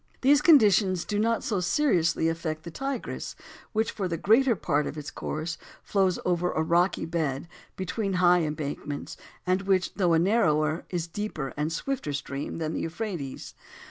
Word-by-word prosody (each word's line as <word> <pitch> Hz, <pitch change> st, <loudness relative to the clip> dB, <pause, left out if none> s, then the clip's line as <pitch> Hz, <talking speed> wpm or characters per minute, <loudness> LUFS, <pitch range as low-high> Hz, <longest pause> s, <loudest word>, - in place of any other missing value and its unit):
These 285 Hz, +2 st, +5 dB
conditions 205 Hz, -, +5 dB
do 205 Hz, -1 st, -1 dB
not 230 Hz, +1 st, +1 dB
so 220 Hz, -7 st, 0 dB
seriously 175 Hz, -, +2 dB
affect 165 Hz, -1 st, -3 dB
the 170 Hz, -, -7 dB
Tigris, 270 Hz, +5 st, -4 dB, 0.4 s
which 220 Hz, 0 st, 0 dB
for 200 Hz, -4 st, -3 dB
the 165 Hz, -1 st, -2 dB
greater 230 Hz, +7 st, +4 dB
part 150 Hz, -5 st, 0 dB
of 155 Hz, -, -6 dB
its 150 Hz, -1 st, -6 dB
course 165 Hz, +2 st, -4 dB, 0.2 s
flows 190 Hz, -3 st, +1 dB
over 180 Hz, 0 st, +1 dB
a 160 Hz, -, +1 dB
rocky 175 Hz, +3 st, +2 dB
bed, 160 Hz, -3 st, -2 dB, 0.3 s
between 195 Hz, +2 st, -2 dB
high 180 Hz, -1 st, +5 dB
embankments, 150 Hz, -2 st, -4 dB, 0.3 s
and 185 Hz, +1 st, +2 dB
which, 190 Hz, -1 st, +1 dB
though 180 Hz, -4 st, +2 dB
a -, -, +5 dB
narrower, 160 Hz, -5 st, +2 dB
is 175 Hz, -3 st, -2 dB
a -, -, -17 dB
deeper 175 Hz, -9 st, -4 dB
and 150 Hz, +2 st, -1 dB
swifter 250 Hz, -, -3 dB
stream 140 Hz, 0 st, -4 dB
than 160 Hz, -1 st, -2 dB
the -, -, -2 dB
Euphrates. 165 Hz, -6 st, -5 dB
175 Hz, 170 wpm, -27 LUFS, 160-205 Hz, 0.4 s, These